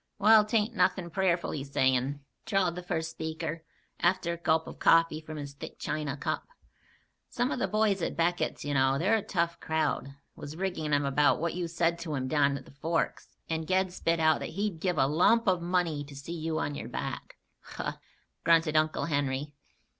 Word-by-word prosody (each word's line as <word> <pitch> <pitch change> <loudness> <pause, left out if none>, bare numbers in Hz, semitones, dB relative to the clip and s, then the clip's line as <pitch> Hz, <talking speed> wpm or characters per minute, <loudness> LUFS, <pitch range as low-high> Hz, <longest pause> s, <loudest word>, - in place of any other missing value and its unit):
"Wal, 215 +1 +7
'tain't 220 +1 +1
nothin' 180 -2 +1
prayerful 180 -2 +1
he's 140 -2 -5
sayin'," 130 +1 +1 0.3
drawled 195 -4 +2
the 180 - -6
first 165 -3 -3
speaker, 160 0 -4 0.4
after 175 -1 +1
a - - -5
gulp 160 -1 +1
of - - -10
coffee 165 -1 +4
from 155 0 -8
his 140 -1 -6
thick 140 - -9
china 150 -2 -3
cup. - - -3 0.8
"Some 245 +3 -1
of - - -2
the - - +1
boys 210 -3 +1
at - - -2
Beckett's, 175 -1 0
you 145 - -1
know, 135 0 +3
they're 190 +9 +2
a - - -2
tough 170 -3 -1
crowd, 155 -3 -1 0.2
was 145 +2 -8
riggin' 175 -4 -2
him 145 -1 +2
about 145 +1 +3
what 170 +1 -1
you 175 -1 -2
said 170 0 0
to 165 -3 -4
him 130 -1 -2
down 140 -1 +2
to - - -5
the - - -16
Forks, 160 +4 -2
and 160 -1 -2
Ged 185 -1 +1
spit 165 -2 0
out 155 0 +4
that - - -5
he'd 195 -1 -2
give 180 -1 0
a 135 - +4
lump 175 +11 +3
of 180 -2 +3
money 170 -4 0
to 140 0 -12
see 140 +5 -7
you 160 -1 -2
on 145 - -1
your - - -6
back." - - -5 0.2
"Huh!" - - -5 0.5
grunted 165 -2 +4
Uncle 155 0 +2
Henry. 145 -1 -1
165 Hz, 200 wpm, -29 LUFS, 145-180 Hz, 0.8 s, Wal